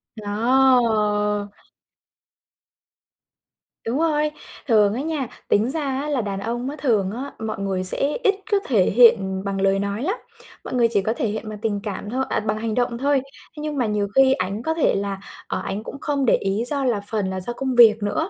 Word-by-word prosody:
Đó. 215 -2 +2 2.4
Đúng 245 +5 -1
rồi. 300 -2 +1 0.4
Thường 210 -4 +4
á 245 - -3
nha, 300 -4 -2 0.2
tính 215 +4 +3
ra 315 - -1 0.2
á 300 - -4
là 280 -4 0
đàn 200 -2 -4
ông 240 +5 -3
á, 290 - -6
thường 210 -8 +1
á 260 +6 -6
mọi 220 -2 -4
người 195 -2 -2
sẽ 275 +10 +3
ít 410 -3 +4 0.2
có 410 - +4
thể 215 -9 +3
hiện, 235 +2 +7
ừm, 190 0 -4
bằng 195 -1 -3
lời 195 0 +2
nói 200 +4 -3
lắm, 380 +8 0 0.5
mọi - - -7
người 240 -2 +3
chỉ 205 -3 +2
có 215 +3 -1
thể 230 - -2
hiện 215 +1 -4
bằng 210 -1 -7
tình 215 -3 -1
cảm 205 0 -5
thôi 260 +3 -1
à, - - 0
bằng 215 0 -2
hành 220 0 -3
động 245 -1 0
thôi. 280 +2 +2
Thế 275 +2 -14
nhưng 300 -1 -3
mà 250 - +1
nhiều 210 -1 -1
khi 270 0 +6
ảnh 195 +1 -3
có 320 - 0
thể 320 - +2
là, 200 0 -2 0.3
ờ, - - -3
ảnh 205 +2 -4
cũng 280 - -8
không 285 -2 -1
để - - +5
ý 195 +3 -1
do 280 -1 +1
là 230 -5 0
phần 210 -4 -1
là 190 0 -3
do 210 +6 -3
công 260 +1 -3
việc 225 -3 +6
nữa, 315 - -1
225 Hz, 215 wpm, -22 LUFS, 205-265 Hz, 2.4 s, hiện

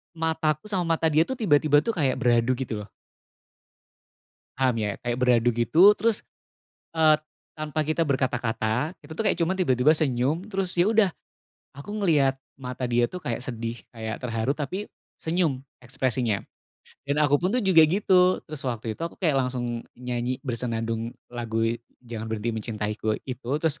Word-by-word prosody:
mataku 160 +1 -1
sama 185 -4 +1
mata 160 - +1
dia, 155 +2 +5
tuh, 265 - -3
tiba-tiba, 150 -6 +4
tuh, 230 +2 -2
kayak 140 -6 +1
beradu, 120 +1 +3
gitu, 110 -5 -4
loh. - - -23 1.7
Paham, 130 -4 +2
ya, 105 -2 -1
kayak 120 +1 -1
beradu, 120 -1 +4
gitu, 160 - +6
terus, 225 0 +1 0.7
eee, 160 -2 +5 0.4
tanpa 155 0 -4
kita 160 +1 +1
berkata-kata, 125 -1 0
kita, 160 - -11
tuh, 220 - -1
kayak 205 - +1
cuma 175 +3 +1
tiba-tiba 150 -4 +3
senyum 145 +3 +1
terus, 195 -3 -2
ya, 175 +1 +4
udah, 215 -4 +4 0.6
aku 140 +7 -10
ngeliat 145 -9 +3 0.2
mata 125 0 -4
dia, 120 0 +2
tuh, 180 - -6
kayak 120 -8 -3
sedih, 115 -2 -5
kayak 110 0 -6
terharu 115 +1 -1
tapi 160 +8 -4 0.3
senyum 160 -6 -1 0.2
ekspresinya, 125 -4 -1 0.6
dan 140 - +1
aku 145 -1 +3
pun, 180 - +1
tuh, 245 +1 0
juga 185 -4 +6
gitu. 185 0 +3
Terus 155 -3 -7
waktu 115 -2 -3
itu - - -24
aku 170 - -4
kayak 160 -7 +2
langsung 120 -2 -2 0.2
nyanyi 125 0 -2
bersenandung 115 -2 -2 0.2
lagu 115 -2 -1 0.4
"Jangan 115 -2 -6
Berhenti 110 +1 -2
Mencintaiku" 110 -1 -2
itu, 130 -1 -6
terus 160 -2 0
130 Hz, 155 wpm, -26 LUFS, 120-160 Hz, 1.7 s, gitu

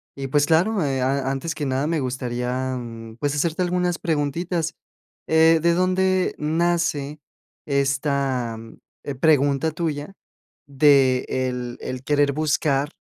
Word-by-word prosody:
Y, 135 -1 -5
pues, 145 +2 +2
claro, 180 +4 +2
eh, 135 -2 -1
a 135 +1 0
antes 150 +5 -3
que 145 -3 -3
nada, 135 +2 0
me 160 -1 0
gustaría, 125 0 -2
mm, 115 -1 -9
pues, 145 0 -1
hacerte 165 +4 0
algunas 180 -1 0
preguntitas. 165 +2 -1 0.5
Eh, 160 0 +5
¿de 170 0 +3
dónde 185 0 +1
nace 155 -2 0 0.5
esta, 135 -4 0
mm, 115 0 -12 0.3
eh, 140 - -4
pregunta 145 +1 +2
tuya 155 +2 -4 0.5
de, 135 -2 +4
el 125 -2 -3
el 130 0 -5
querer 145 0 +2
buscar, 145 -1 0
145 Hz, 135 wpm, -23 LUFS, 130-165 Hz, 0.5 s, Eh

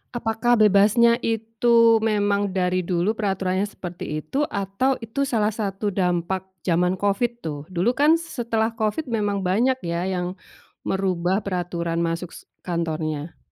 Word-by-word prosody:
Apakah 235 +1 +1
bebasnya 215 +3 +5
itu 230 0 +3
memang 205 -2 +1
dari 185 0 +1
dulu 180 +2 0
peraturannya 195 -2 -1
seperti 175 -6 -6
itu, 290 +2 -1
atau 200 +7 0
itu 275 +5 -2
salah 220 -4 +1
satu 205 -1 -2
dampak 180 0 -1 0.2
jaman 180 +1 +2
Covid 205 +5 +1
tuh? 150 -3 -4
Dulu 185 +5 +1
kan 295 +5 +4
s 335 -5 -9
setelah 230 -1 0
Covid 220 +7 -1
memang 205 -3 0
banyak 230 +8 +2
ya 170 0 -2
yang 180 -1 -2 0.5
merubah 190 0 0
peraturan 175 -3 -2
masuk 170 +1 -2
s - - -13 0.2
kantornya. 160 -3 -3
200 Hz, 140 wpm, -23 LUFS, 180-225 Hz, 0.5 s, bebasnya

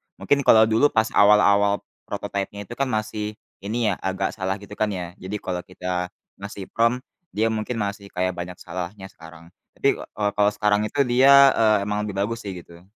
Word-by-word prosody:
Mungkin 145 - +1
kalau 110 -1 +8
dulu 110 +6 +4
pas 110 -4 0
awal-awal 100 0 +4 0.2
prototype-nya 100 +1 -4
itu 110 - -9
kan 140 - +1
masih 110 -2 -3 0.3
ini 110 +1 0
ya - - -1
agak 95 0 -2
salah 95 -2 -3
gitu 100 0 -13
kan 110 - +2
ya. 90 -3 -5
Jadi 95 +3 -6
kalau 90 -1 -3
kita 90 -1 -3 0.3
ngasih 100 -1 -8
prompt, 115 +3 +1 0.3
dia 110 +2 +2
mungkin 110 +2 -3
masih 100 -2 -4
kayak 95 -1 -1
banyak 90 0 -6
salahnya 95 +3 -7
sekarang. 85 +1 -15 0.2
Tapi, - - +1
eee, 105 -1 -3
kalau 105 0 +4
sekarang 105 0 +1
itu 140 +7 0
dia, 135 +2 +7
eee, 110 -1 +4
emang 105 +1 -2
lebih 105 - -5
bagus 115 +1 -3
sih 100 - -4
gitu. 85 +1 -17
105 Hz, 185 wpm, -23 LUFS, 95-110 Hz, 0.3 s, kalau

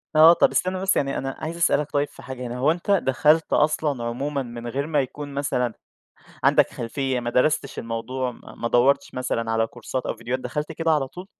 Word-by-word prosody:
آه، 160 +2 +9
طَب - - +3
استنّى 185 0 0
بس 195 0 +2
يعني 135 -1 0
أنا 135 0 -3
عايز 165 +2 -5
أسألك 150 -3 +2
طيب 145 0 +1
في 140 - -15
حاجة 125 -1 -6
هنا، 120 +1 -5
هو 135 +5 +3
أنت 175 +4 -2
دخلت 155 -2 +3
أصلًا 150 -4 +1
عمومًا 135 +4 -2
من 120 -1 -8
غير 140 +5 -2
ما 150 -3 +2
يكون 145 +2 -7
مثلًا 125 -4 -1 0.7
عندك - - +5
خلفية، 130 +2 -2
ما 120 0 -3
درستش 140 +3 +1
الموضوع، 125 +3 -3
ما - - -14
ما 115 - -3
دوّرتش 125 +4 +2
مثلًا 115 -3 -2
على 115 0 +2
كورسات 130 +3 -5
أو - - -3
فيديوهات، 125 +3 -3
دخلت 150 +5 -3
كده 165 +1 -1
على 150 -4 +2
طول؟ 180 +7 -10
135 Hz, 205 wpm, -24 LUFS, 125-150 Hz, 0.7 s, آه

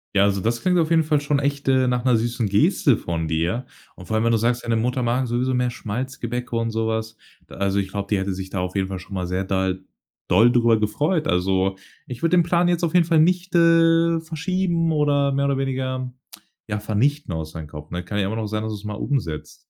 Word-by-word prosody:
Ja, 100 - +5
also 100 -1 +1
das 115 +3 -1
klingt 180 -1 +2
auf 160 -2 +1
jeden 165 -1 +4
Fall 150 -1 +1
schon 145 -1 0
echt, 140 0 -2
äh, 130 -1 +3
nach 125 -1 0
'ner 125 - +4
süßen 115 -1 -1
Geste 100 +1 +3
von 80 -1 -3
dir. 85 +10 -1 0.3
Und 90 - -12
vor 110 - -1
allem, 110 - +1
wenn 115 - +3
du 115 - +3
sagst, 120 +2 0
deine 115 -1 0
Mutter 125 +3 -1
mag 125 +2 0
sowieso 125 +2 0
mehr 125 -1 +1
Schmalzgebäck 120 +1 -5
und 115 -1 0
so 110 0 -1
was. 110 0 -3 0.3
Da - - -12
also 100 0 0
ich 95 -1 -3
glaube, 100 0 -4
die 105 - +2
hätte 95 0 -2
sich 95 0 -6
da 95 - -3
auf 90 +1 -3
jeden 95 -1 0
Fall 95 -1 -5
schon 95 +2 -12
mal 90 -2 -2
sehr 90 +2 -1
dal 95 -1 -1 0.5
doll 110 +7 +5
drüber 120 -2 +3
gefreut. 150 - 0
Also, 95 +1 +1 0.3
ich 125 -2 -8
würde 165 +2 +2
den 170 - +5
Plan 175 +1 +2
jetzt 175 0 0
auf 165 - 0
jeden 175 -2 +5
Fall 165 -2 +3
nicht, 180 +2 +1
äh, 165 0 +4
verschieben 165 +1 -1
oder 145 -2 +2
mehr 140 +1 0
oder 140 -1 +1
weniger 130 -1 -2 0.6
ja 105 -1 -2
vernichten 110 - 0
aus 80 -1 -5
deinem 80 -1 -7
Kopf, 75 0 -10
ne? 90 0 -4
Kann 105 +3 -3
ja 100 - +1
immer 110 - -3
noch 110 -1 -3
sein, 110 +1 -3
dass 110 -1 -3
du - - -5
es 100 - -14
mal 105 0 -4
umsetzt. 80 - -3
120 Hz, 245 wpm, -22 LUFS, 100-145 Hz, 0.6 s, Ja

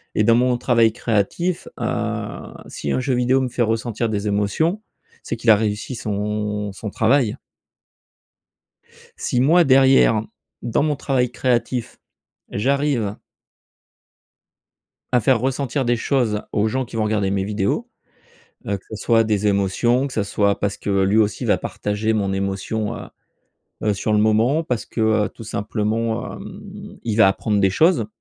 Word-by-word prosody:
Et 105 - +3
dans 115 +2 +5
mon 125 +1 +2
travail 115 -3 +3
créatif, 120 - -1
heu, - - -3
si 70 - -4
un - - +1
jeu 130 +1 -1
vidéo 125 +2 +2
me 130 - -1
fait 120 - -3
ressentir 115 0 -1
des 105 -1 -2
émotions, 105 - 0 0.4
c'est - - -3
qu'il 115 0 -1
a 110 - +9
réussi 105 +4 -2
son 105 -1 -3
son 105 +3 -6
travail 115 +2 +2 1.8
si 125 - -1
moi 165 +7 +5
derrière, 130 -5 +5 0.4
dans 120 - 0
mon 150 -1 +1
travail 125 -3 0
créatif, 125 -1 -1 0.5
j'arrive 130 -3 0 2.0
à 125 - +4
faire 120 +1 +3
ressentir 135 +1 -1
des 120 0 +2
choses, 115 -4 0
aux 105 +1 +1
gens 130 +4 -1
qui 115 - -11
vont 110 - +1
regarder 105 -2 0
mes 95 -1 0
vidéos, 100 -1 -1 0.8
heu, 100 - 0
que 95 - -19
ce - - -4
soit 115 +2 +3
des 105 -2 0
émotions, 105 +6 +1
que 135 - -9
ce 110 - 0
soit 100 0 0
parce 100 0 -1
que - - -5
lui 100 +3 +2
aussi 105 -1 +1
va - - +3
partager 105 +2 -2
mon 100 -3 0
émotion, 100 +2 -2
heu, - - -9 0.8
heu, 105 -1 +2
sur 105 +2 -2
le 105 - +3
moment, 110 +9 +3
parce 125 -6 -2
que, 110 -2 +1
tout 115 - -12
simplement, 110 +2 -2
heu, - - -10
il 110 -3 -1
va 110 -3 +6
apprendre 105 +1 0
des 95 -1 +3
choses 155 - +3
110 Hz, 155 wpm, -21 LUFS, 105-125 Hz, 2.0 s, a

